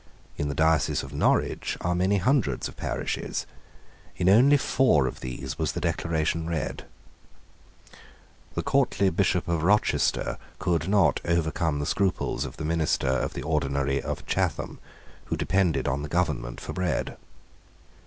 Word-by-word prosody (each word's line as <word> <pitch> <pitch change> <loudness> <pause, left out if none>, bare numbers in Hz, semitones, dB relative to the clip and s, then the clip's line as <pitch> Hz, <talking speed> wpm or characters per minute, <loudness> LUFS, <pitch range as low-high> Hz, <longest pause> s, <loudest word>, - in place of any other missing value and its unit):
In 75 - -2
the 70 - -3
diocese 80 0 +2
of 70 +1 -9
Norwich 70 - +1
are 85 - 0
many 95 +3 +2
hundreds 100 - +1
of - - -11
parishes. - - -3 0.7
In 90 0 +2
only 130 +8 +6
four 125 - +3
of - - -4
these 65 +1 -6
was - - 0
the - - -3
Declaration 80 0 -1
read. 80 -4 -3 1.7
The - - -1
courtly 115 -8 +2
Bishop 90 0 +1
of 85 -2 0
Rochester 105 +6 +1 0.2
could 85 -2 0
not 100 -1 +3
overcome 80 -2 0
the 75 - -2
scruples 95 +4 0
of - - -8
the 75 - -4
minister 80 -4 +1
of 65 - -1
the - - -4
ordinary 70 -3 0
of - - -5
Chatham, - - -1 0.5
who - - -2
depended 90 -7 +1
on 70 +2 0
the 75 - -5
government 70 -8 -1
for 80 - -6
bread. 90 +1 -1
80 Hz, 145 wpm, -26 LUFS, 75-95 Hz, 1.7 s, only